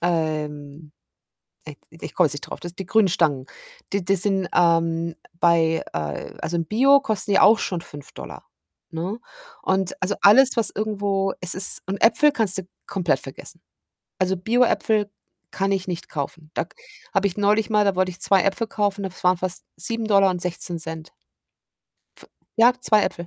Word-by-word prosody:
ähm, 155 -3 -3 0.8
i - - -9 0.2
ich - - -7
komme - - +3
jetzt - - 0
nicht - - -6
drauf. - - -8
Das 175 0 -8
die 190 - -6
grünen 205 +2 +3
Stangen, 155 -7 0 0.5
die 200 -1 0
die 195 +3 +2
sind, 190 -1 0
ähm, 165 -1 +2 0.2
bei 165 -2 +3
äh, 75 -2 -5
also, 170 - -2
in 165 - -2
Bio 270 - +5
kosten 220 -6 -1
ja 195 - +4
auch 215 +3 +7
schon 180 - -2
5$, 145 -4 -11 0.5
ne? 175 +7 -4 0.4
Und, 190 -1 -1
also, 195 +2 0
alles, 260 +6 +7
was 230 -4 +3
irgendwo 200 -2 -1
es 180 -1 -1
ist 185 0 0
und 195 - -3
Äpfel 240 +7 +5
kannst 220 -9 +2
du 190 - -4 0.2
komplett 170 -8 0
vergessen. 170 +5 -10 0.6
Also, 185 0 +1
Bio-Äpfel 220 -1 +1 0.4
kann 195 +1 -1
ich 190 -1 -1
nicht 175 -2 -5
kaufen. 155 +1 -6
Da - - -1
k - - -26 0.4
habe 200 -1 +2
ich 180 - -5
neulich 210 +2 +2
mal, 210 -1 +3
da 200 -2 +1
wollte 185 0 +1
ich 175 - -12
2 195 -2 +4
Äpfel 200 +3 -1
kaufen, 205 -2 -1
das 190 -1 -7
waren 180 0 +3
fast 185 0 -4
7,16$. 180 -5 -1 1.1
F - - -16 0.3
ja, 235 +2 +6
2 215 -4 +3
Äpfel. 170 - -3
190 Hz, 170 wpm, -23 LUFS, 170-205 Hz, 1.1 s, auch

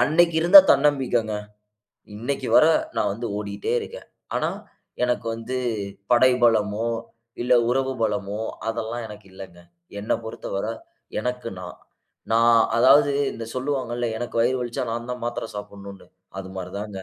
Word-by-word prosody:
அன்னக்கி 165 +5 +3
இருந்த 175 +4 +10
தன்னம்பிக்கைங்க, 135 -6 +2 0.8
இன்னைக்கு 125 +6 -3
வர, - - +7 0.3
நான் 100 - +1
வந்து 115 +3 -5
ஓடிட்டே 100 -1 -3
இருக்கேன். - - -9 0.3
ஆனா, - - 0 0.5
எனக்கு 125 -1 0
வந்து, 115 +3 -5 0.5
படை 125 +1 +6
பலமோ, 110 -1 +2 0.6
இல்ல 125 - +3 0.2
உறவு 130 +1 0
பலமோ, 105 -1 -2 0.3
அதெல்லாம் 115 +1 -3
எனக்கு 105 -1 -12
இல்லங்க. 95 -2 -11 0.4
என்ன 105 - -2
பொறத்தவர, 105 -2 -4 0.5
எனக்கு 125 +1 -3
நான். 90 -1 -9 0.5
நான் 115 0 +5 0.2
அதாவது, 140 +4 +6 0.2
இந்த 115 - -7
சொல்லுவாங்கள்ள, 125 -3 -2
எனக்கு 120 - -5
வயிறு 125 +3 +2
வலிச்சா 125 +2 -3
நான் 120 +1 -5
தான் 125 - -8
மாத்தரை 120 -1 -3
சாப்டணும்னு, 100 -1 -9 0.3
அது 95 0 -9
மாரி 90 -1 -6
தாங்க. 105 -1 -6
115 Hz, 135 wpm, -23 LUFS, 105-130 Hz, 0.8 s, இருந்த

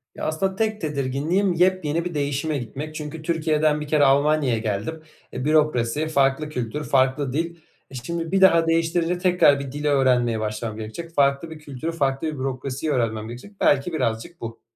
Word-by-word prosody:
Ya, - - -5
aslında 190 +5 -1
tek 215 +1 -1
tedirginliğim 150 +6 0
yepyeni 170 -2 +1
bir 175 - -4
değişime 145 +1 -1
gitmek; 140 +6 -6
çünkü 155 +1 -6
Türkiye'den 155 -2 +1
bir 150 - -5
kere 150 -1 +3
Almanya'ya 140 -2 +3
geldim. 110 +9 -3 0.3
E, 130 - -4
bürokrasi, 150 -2 +2
farklı 140 0 +1
kültür, 125 +1 -4
farklı 130 -1 +1
dil. 165 +3 -2 0.4
E, - - -9
şimdi 165 +6 -4
bir 195 0 +2
daha 170 -3 +6
değiştirince 165 +1 +1
tekrar 180 -6 +4
bir 140 -1 -6
dil 145 +2 -5
öğrenmeye 125 -5 +2
başlamam 110 0 -4
gerekecek. 140 +10 -7
Farklı 140 +3 +2
bir 160 - -9
kültürü, 150 +1 -5
farklı 140 -2 -1
bir 155 - -2
bürokrasiyi 135 +3 -3
öğrenmem 110 -5 -1
gerekecek. 120 - -9
Belki 145 +5 +2
birazcık 130 +4 -2
bu. 115 0 -7
150 Hz, 170 wpm, -23 LUFS, 130-165 Hz, 0.4 s, daha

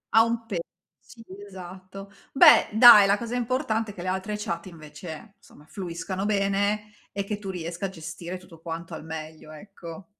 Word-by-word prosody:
Ha 225 - +8
un 230 0 -2
pe 195 -6 -3 0.4
sì, 230 -2 -16 0.2
esatto. 190 +1 -10 0.2
Beh 305 +3 +7
dai, 220 -3 +9
la 200 +1 +3
cosa 235 +2 -5
importante 230 -3 -1
è - - -15
che 175 - -8
le - - -5
altre 190 +3 -3
chat 180 -4 -4
invece, 160 +4 -10
insomma 150 - -19
fluiscano 185 +1 -5
bene 205 +1 0 0.2
e 200 0 -3
che 205 +1 -4
tu 200 -2 -7
riesca 175 +1 -4
a - - -8
gestire 175 +1 -7
tutto 175 -3 -16
quanto 165 0 -7
al 155 - -7
meglio, 155 -1 -8
ecco. 170 +1 -11
190 Hz, 175 wpm, -26 LUFS, 170-210 Hz, 0.4 s, dai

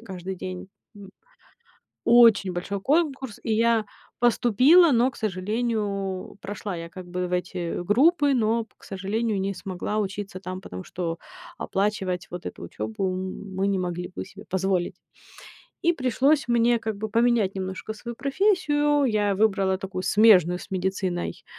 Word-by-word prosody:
каждый 190 -4 -7
день. 185 +1 -7 0.3
М. 200 -1 -11 0.9
Очень 230 -5 +6
большой 190 +3 -4
конкурс. 275 - 0
И 225 - 0
я 230 0 +2 0.3
поступила, 250 - +5
но, 245 +1 +3
к - - -18
сожалению, 205 -1 -2
прошла 200 -1 -5
я 165 0 -7
как 185 +1 -10
бы 180 0 -3
в 180 - -9
эти 180 -1 -2
группы, 285 - +4
но, 230 -1 +1
п - - -34
к - - -25
сожалению, 205 +2 -2
не 195 +1 -1
смогла 190 +3 -4
учиться 195 -1 -4
там, 185 -1 -6
потому 90 - -8
что 170 -2 -4 0.4
оплачивать 195 -2 -1
вот 175 0 -7
эту - - -9
учёбу 195 -4 -3
мы 190 +1 -3
не 200 - +1
могли 180 -1 -3
бы - - -4
себе 195 +2 -13
позволить. 190 -1 0 0.9
И 345 -1 +4
пришлось 270 0 +1
мне 235 0 +3
как 220 -2 -4
бы 215 +1 -5
поменять 230 -3 +2
немножко 190 +2 -5
свою 235 +2 -8
профессию. 295 - +2
Я 210 -5 +1
выбрала 195 -2 +2
такую 190 -1 -5
смежную 185 -3 +5
с - - -12
медициной, 185 -1 -2
200 Hz, 150 wpm, -25 LUFS, 185-235 Hz, 0.9 s, Очень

